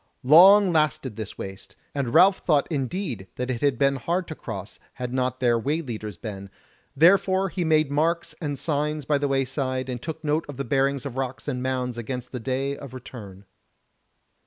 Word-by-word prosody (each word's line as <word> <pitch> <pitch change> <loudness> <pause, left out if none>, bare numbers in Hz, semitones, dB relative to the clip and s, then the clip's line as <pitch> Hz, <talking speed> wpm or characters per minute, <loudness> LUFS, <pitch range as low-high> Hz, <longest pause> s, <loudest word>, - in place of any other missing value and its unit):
Long 185 +7 +7
lasted 140 -6 +1
this 110 -1 -7
waste, 95 0 -8 0.2
and 135 -4 -2
Ralph 190 +7 +6
thought 150 -5 +2
indeed 135 - -3
that 125 +1 -2
it 120 - -4
had 140 -4 +2
been 140 +1 +2
hard 170 +8 -2
to - - -4
cross, 100 -9 -8
had 125 -1 -5
not 130 0 -1
their 120 -2 +2
way 145 +7 -1
leaders 110 - -6
been; 100 0 -7 0.5
therefore 190 +4 +4
he 180 0 -2
made 155 -3 +2
marks 165 +4 0
and 145 -3 -3
signs 150 0 -1
by 145 0 +1
the 145 - 0
wayside, 130 -1 -1
and 125 -1 -4
took 160 +1 -6
note 155 +1 0
of 140 - -7
the 140 - -3
bearings 135 +1 0
of 135 -2 -6
rocks 130 +1 -4
and 125 -3 -2
mounds 125 -2 -2
against 125 +1 -5
the 125 - -4
day 135 +3 -2
of 140 -3 -10
return. 100 -6 -10
135 Hz, 185 wpm, -25 LUFS, 125-155 Hz, 0.5 s, Long